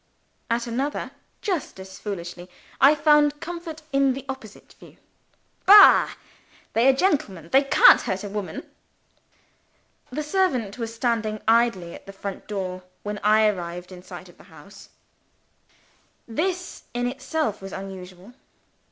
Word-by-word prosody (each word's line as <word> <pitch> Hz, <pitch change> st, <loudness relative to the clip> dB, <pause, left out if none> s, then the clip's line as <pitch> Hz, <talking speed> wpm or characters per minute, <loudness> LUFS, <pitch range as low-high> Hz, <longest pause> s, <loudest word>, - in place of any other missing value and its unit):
At 235 Hz, +1 st, 0 dB
another, 265 Hz, +5 st, -3 dB, 0.3 s
just 360 Hz, -, -3 dB
as 190 Hz, 0 st, -11 dB
foolishly, 175 Hz, -3 st, -7 dB, 0.3 s
I 280 Hz, +3 st, +6 dB
found 295 Hz, -1 st, +3 dB
comfort 330 Hz, -2 st, -7 dB
in 275 Hz, -1 st, +3 dB
the 270 Hz, +1 st, -8 dB
opposite 265 Hz, -6 st, -9 dB
view. -, -, -16 dB, 0.7 s
"Bah! 410 Hz, +1 st, +8 dB, 0.6 s
They 230 Hz, +3 st, +3 dB
are -, -, +6 dB
gentlemen; 260 Hz, -, -1 dB
they 270 Hz, -, +6 dB
can't 275 Hz, -, +6 dB
hurt 190 Hz, +1 st, -3 dB
a 205 Hz, -, -5 dB
woman!" 205 Hz, -1 st, -6 dB, 1.4 s
The 300 Hz, +4 st, -4 dB
servant 280 Hz, -, 0 dB
was 230 Hz, -1 st, -4 dB
standing 225 Hz, -2 st, -1 dB
idling 225 Hz, -7 st, +2 dB
at -, -, -13 dB
the 195 Hz, -, -9 dB
front 195 Hz, 0 st, -7 dB
door, 185 Hz, -3 st, -4 dB, 0.2 s
when 210 Hz, 0 st, -4 dB
I 215 Hz, +1 st, +4 dB
arrived 180 Hz, -3 st, -3 dB
in 180 Hz, -1 st, -10 dB
sight -, -, -11 dB
of -, -, -19 dB
the -, -, -16 dB
house. -, -, -15 dB, 1.4 s
This, 360 Hz, +9 st, -3 dB
in 245 Hz, 0 st, -1 dB
itself, 260 Hz, -3 st, -2 dB
was 195 Hz, 0 st, -8 dB
unusual. 190 Hz, +2 st, -9 dB
230 Hz, 135 wpm, -24 LUFS, 195-285 Hz, 1.4 s, Bah